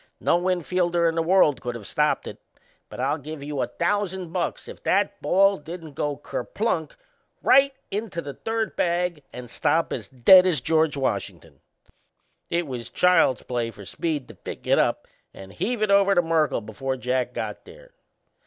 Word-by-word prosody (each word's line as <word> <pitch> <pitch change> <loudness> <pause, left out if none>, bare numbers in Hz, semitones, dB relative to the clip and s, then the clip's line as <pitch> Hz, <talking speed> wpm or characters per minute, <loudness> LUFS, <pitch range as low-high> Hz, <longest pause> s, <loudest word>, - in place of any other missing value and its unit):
No 170 - +2
infielder 175 -1 +1
in 165 - +1
the 165 - 0
world 165 -5 +3
could 120 -1 -4
of 110 -3 -8
stopped - - 0
it. - - -8 0.5
But - - -10
I'll 140 +5 0
give 150 0 -8
you 145 -2 -3
a 125 - 0
thousand 185 +4 -2
bucks 180 -2 -3
if - - -10
that 200 +1 0
ball 195 +2 +4
didn't 160 -1 -9
go 145 0 -2
kerplunk - - -3 0.5
right 275 +1 +5 0.2
into 205 -4 -3
the 140 -4 -6
third 225 +4 -3
bag 175 -2 0
and 125 0 -8
stop 155 +6 0
as - - -5
dead 180 +9 +7
as 165 -6 +2
George 155 +2 +1
Washington! 95 - -3 0.9
It 170 0 0
was 120 -4 -6
child's 170 -4 +3
play 120 -2 -2
for 105 -3 -12
Speed 150 - -3
to - - -10
pick - - -9
it - - +3
up - - 0 0.3
and 95 0 -11
heave 215 +4 -2
it 210 - +1
over 200 0 +5
to 175 - +5
Merkle 160 -6 +1
before 130 +5 -4
Jack 125 0 -1
got - - -5
there. - - -15
160 Hz, 175 wpm, -24 LUFS, 130-185 Hz, 0.9 s, dead